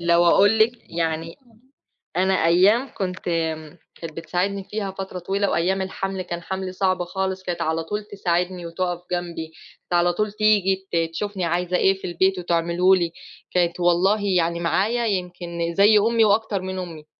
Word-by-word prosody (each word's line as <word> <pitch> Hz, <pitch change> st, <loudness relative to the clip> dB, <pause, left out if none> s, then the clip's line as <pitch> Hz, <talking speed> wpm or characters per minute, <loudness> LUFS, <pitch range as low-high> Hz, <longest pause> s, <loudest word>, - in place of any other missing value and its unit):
لو 170 Hz, 0 st, +3 dB
اقول 205 Hz, +5 st, +5 dB
لِك 220 Hz, +2 st, +4 dB, 0.3 s
يعني 165 Hz, 0 st, -2 dB, 0.8 s
أنا 190 Hz, +1 st, +3 dB
أيام 200 Hz, +10 st, +4 dB
كنت 185 Hz, -2 st, -3 dB, 0.4 s
م 155 Hz, +1 st, -13 dB, 0.2 s
كانت 165 Hz, -2 st, -8 dB
بتساعدني 190 Hz, +4 st, -2 dB
فيها 200 Hz, -1 st, -4 dB
فترة 190 Hz, -1 st, -6 dB
طويلة، 195 Hz, +3 st, -1 dB
وأيام 190 Hz, +3 st, +1 dB
الحَمل 190 Hz, 0 st, -3 dB
كان 175 Hz, -1 st, -5 dB
حَملي 190 Hz, +1 st, -4 dB
صعب 185 Hz, -1 st, 0 dB
خالص 190 Hz, +1 st, -3 dB
كانت 175 Hz, -2 st, -3 dB
على 160 Hz, +1 st, 0 dB
طول 210 Hz, +5 st, -4 dB
تساعدني 180 Hz, -3 st, -2 dB
وتُقف 175 Hz, +1 st, -3 dB
جنبي، 175 Hz, -2 st, -3 dB, 0.4 s
كانت -, -, -8 dB
على 175 Hz, 0 st, +3 dB
طول 210 Hz, +2 st, -1 dB
تيجي 200 Hz, -3 st, +2 dB
ت -, -, -2 dB, 0.2 s
تشوفني 200 Hz, 0 st, -3 dB
عايزة 180 Hz, +1 st, 0 dB
إيه 190 Hz, -, +4 dB
في -, -, -4 dB
البيت 185 Hz, +2 st, +1 dB
وتعمله 175 Hz, +2 st, +2 dB
لي، 170 Hz, -3 st, -1 dB, 0.4 s
كانت 175 Hz, -1 st, +1 dB
والله 175 Hz, +4 st, +3 dB, 0.2 s
يعني 170 Hz, 0 st, 0 dB
معايا 215 Hz, +8 st, +1 dB
يمكن 175 Hz, -3 st, -3 dB
زي 210 Hz, +2 st, +6 dB
أمي 225 Hz, +1 st, +3 dB
وأكتر 210 Hz, -2 st, +1 dB
من 190 Hz, 0 st, -4 dB
أمي. 165 Hz, -4 st, -7 dB
185 Hz, 165 wpm, -23 LUFS, 170-195 Hz, 0.8 s, زي